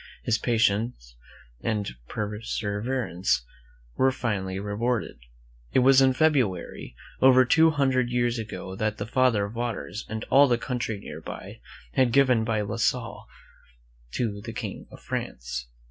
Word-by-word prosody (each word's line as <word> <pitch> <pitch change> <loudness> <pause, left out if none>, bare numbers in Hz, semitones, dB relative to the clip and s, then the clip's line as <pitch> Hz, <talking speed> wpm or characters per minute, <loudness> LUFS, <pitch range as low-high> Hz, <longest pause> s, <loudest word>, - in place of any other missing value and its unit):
His 115 -1 +1
patience 110 - 0 0.5
and 105 - -1 0.2
persever 105 +3 -2
ance 90 -7 0 0.5
were 130 0 +3
finally 95 -7 -2
rewarded. 105 +1 -2 0.5
It - - +5
was 135 0 +7
in 130 -1 +5
February, 130 - 0 0.3
over 130 -1 +7
two 160 +6 +5
hundred 130 -5 +1
years 120 -1 0
ago, 105 -3 -6
that 110 0 -1
the 105 - -4
Father 125 -3 +2
of 100 - -8
Waters 115 -3 -4
and 110 0 -4
all 140 +1 +7
the 120 -2 +2
country 120 -4 -3
nearby - - -8 0.4
was 130 -2 +4
given 125 -3 +4
by 110 -1 0
La 105 +2 -3
Salle 115 0 -1 0.9
to 105 -4 -2
the 115 +1 -7
King 110 -4 -6
of - - -13
France. - - -5
115 Hz, 140 wpm, -26 LUFS, 105-125 Hz, 0.9 s, was